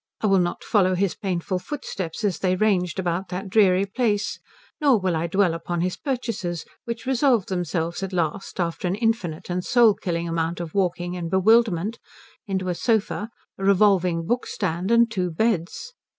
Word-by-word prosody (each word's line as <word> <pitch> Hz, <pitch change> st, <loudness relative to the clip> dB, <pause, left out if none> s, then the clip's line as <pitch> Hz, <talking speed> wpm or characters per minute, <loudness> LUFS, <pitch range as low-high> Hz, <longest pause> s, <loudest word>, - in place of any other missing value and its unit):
I -, -, 0 dB
will 195 Hz, -2 st, +4 dB
not 175 Hz, -1 st, -1 dB
follow 185 Hz, -3 st, +2 dB
his 190 Hz, 0 st, +1 dB
painful 185 Hz, -2 st, -2 dB
footsteps 195 Hz, -, -5 dB
as 200 Hz, -4 st, 0 dB
they 185 Hz, -1 st, +1 dB
ranged 185 Hz, -4 st, +1 dB
about 185 Hz, 0 st, -2 dB
that 190 Hz, +2 st, -5 dB
dreary 195 Hz, -3 st, +4 dB
place, 210 Hz, -1 st, -1 dB, 0.4 s
nor 280 Hz, -7 st, +4 dB
will 185 Hz, -3 st, 0 dB
I 160 Hz, +1 st, -1 dB
dwell 185 Hz, -1 st, +2 dB
upon 165 Hz, +1 st, -3 dB
his 180 Hz, +1 st, -1 dB
purchases, 230 Hz, -, -3 dB, 0.2 s
which 235 Hz, 0 st, -5 dB
resolved 255 Hz, -5 st, +2 dB
themselves 175 Hz, -1 st, -2 dB
at 195 Hz, 0 st, -3 dB
last, 180 Hz, +2 st, -2 dB
after 170 Hz, +1 st, -1 dB
an 180 Hz, -, 0 dB
infinite 215 Hz, -8 st, -1 dB
and 180 Hz, 0 st, -2 dB
soul 235 Hz, -1 st, +5 dB
killing 170 Hz, -3 st, -3 dB
amount 165 Hz, +1 st, -1 dB
of 170 Hz, -2 st, -6 dB
walking 180 Hz, -2 st, -1 dB
and 170 Hz, -2 st, -4 dB
bewilderment, 210 Hz, +1 st, +3 dB, 0.5 s
into 190 Hz, -2 st, -2 dB
a -, -, +1 dB
sofa, 220 Hz, +2 st, 0 dB, 0.3 s
a -, -, -5 dB
revolving 190 Hz, -4 st, +3 dB
bookstand, 190 Hz, -5 st, -2 dB
and 235 Hz, 0 st, +4 dB
two 185 Hz, -5 st, -1 dB
beds. 210 Hz, -, -1 dB
185 Hz, 170 wpm, -24 LUFS, 175-215 Hz, 0.5 s, soul